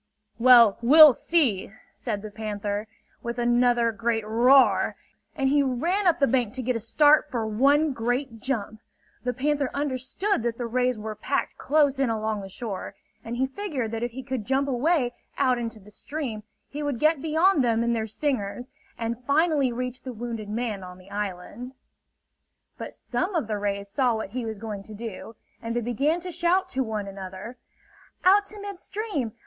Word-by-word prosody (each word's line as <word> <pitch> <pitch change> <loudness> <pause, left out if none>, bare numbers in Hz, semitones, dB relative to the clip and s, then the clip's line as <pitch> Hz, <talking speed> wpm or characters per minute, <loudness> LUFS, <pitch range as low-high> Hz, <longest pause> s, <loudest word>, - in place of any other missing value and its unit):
"Well, 235 -4 +7
we'll 300 +4 +9
see!" 245 - +1 0.2
said 210 -4 -4
the 215 - -7
panther, 205 0 -4 0.3
with 235 0 -4
another 240 -1 +3
great 225 0 -1
roar; 245 +5 +4 0.4
and 270 -2 0
he 285 +1 +4
ran 335 +10 0
up 340 - +3
the 280 - +5
bank 250 -4 0
to 260 - -4
get 250 +1 0
a - - -1
start 295 +7 +4
for 230 -3 -2
one 280 +7 +3
great 245 0 -2
jump. 220 -4 -3 0.4
The 250 - 0
panther 280 +2 0
understood 280 - -1
that 230 0 -2
the 245 - -3
rays 250 +1 0
were 215 0 -5
packed 210 - -2
close 285 -2 +2
in 270 -3 +2
along 220 -2 -2
the 195 - -8
shore; 200 -1 -6 0.3
and 235 +1 -5
he 260 - +2
figured 270 - -4
that 225 0 -3
if 240 - -1
he 265 +1 -6
could 255 -4 -3
jump 270 +5 0
away 265 0 +1 0.2
out 255 -3 +2
into 230 -2 -5
the 210 +1 -16
stream 255 -2 -5 0.3
he 295 - -6
would 290 -4 -2
get 310 +2 +2
beyond 320 0 +3
them 230 -1 +2
and 235 0 +1
their 220 -1 -2
stingers, 245 -1 -3 0.3
and 235 +1 -4
finally 290 -3 +3
reach 250 +1 -4
the 255 - -7
wounded 230 -2 -5
man 215 -3 -3
on 180 0 -10
the 185 +1 -17
island. 205 +5 -5 1.0
But - - -8
some 370 +1 -3
of 325 - +1
the 210 -1 -3
rays 200 0 -2
saw 245 +3 +1
what 220 -3 -5
he 245 0 -3
was 220 -1 -5
going 210 -1 -6
to 215 +2 -11
do, 225 0 -7 0.3
and 230 0 -4
they - - +2
began 275 +8 0
to 360 +1 -6
shout 365 +3 +1
to 265 - -1
one 215 -4 -3
another: 195 +4 -8 0.7
"Out 400 +2 +5
to 420 +1 -7
mid 400 -2 -7
stream! 385 - -4
245 Hz, 185 wpm, -26 LUFS, 220-280 Hz, 1.0 s, we'll